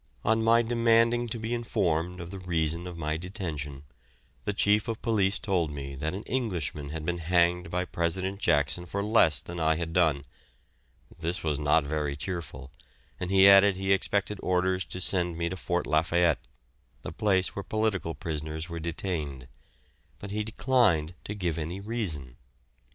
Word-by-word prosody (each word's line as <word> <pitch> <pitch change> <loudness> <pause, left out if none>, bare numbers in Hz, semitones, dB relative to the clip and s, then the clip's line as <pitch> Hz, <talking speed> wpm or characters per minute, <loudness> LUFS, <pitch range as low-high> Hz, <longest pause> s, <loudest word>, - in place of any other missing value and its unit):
On 110 +1 +3
my 115 +1 +5
demanding 115 +1 +3
to 115 - -4
be 110 +1 -3
informed 90 -7 -1
of 85 0 -7
the 95 - -7
reason 85 -1 -1
of 90 -1 -7
my 80 -1 -2
detention, 80 -7 -5 0.6
the 105 - +1
Chief 105 +1 +2
of 115 -1 -3
Police 105 -4 +2
told 95 -8 0
me 70 -2 -6
that 75 +6 -3
an 100 - -6
Englishman 90 - -3
had 80 0 -5
been 85 +1 -1
hanged 85 +1 +2
by 90 +1 -1
President 95 +3 -2
Jackson 75 +1 +1
for 100 +3 -2
less 105 -7 +3
than 85 0 -7
I 80 0 +3
had 80 0 -4
done; 80 -5 +2 0.9
this 85 +3 -2
was 75 -3 0
not 75 +1 +3
very 75 -1 -2
cheerful, 70 -5 -6 0.5
and 90 - -3
he 95 0 +7
added 100 0 +7
he 95 0 -1
expected 100 +1 0
orders 90 0 +1
to 90 - -7
send 90 -2 0
me 85 0 -1
to 95 - -4
Fort 90 -1 -1
Lafayette 80 +1 +2 0.6
the - - -5
place 95 0 +1
where 100 - -3
political 105 -6 -1
prisoners 80 -1 -4
were 85 0 -5
detained 80 -6 -4 0.7
but 100 - -8
he 105 +1 -1
declined 105 - +2
to 105 - -4
give 85 -5 -2
any 85 +5 -4
reason. 90 - -3
90 Hz, 165 wpm, -28 LUFS, 80-100 Hz, 0.9 s, he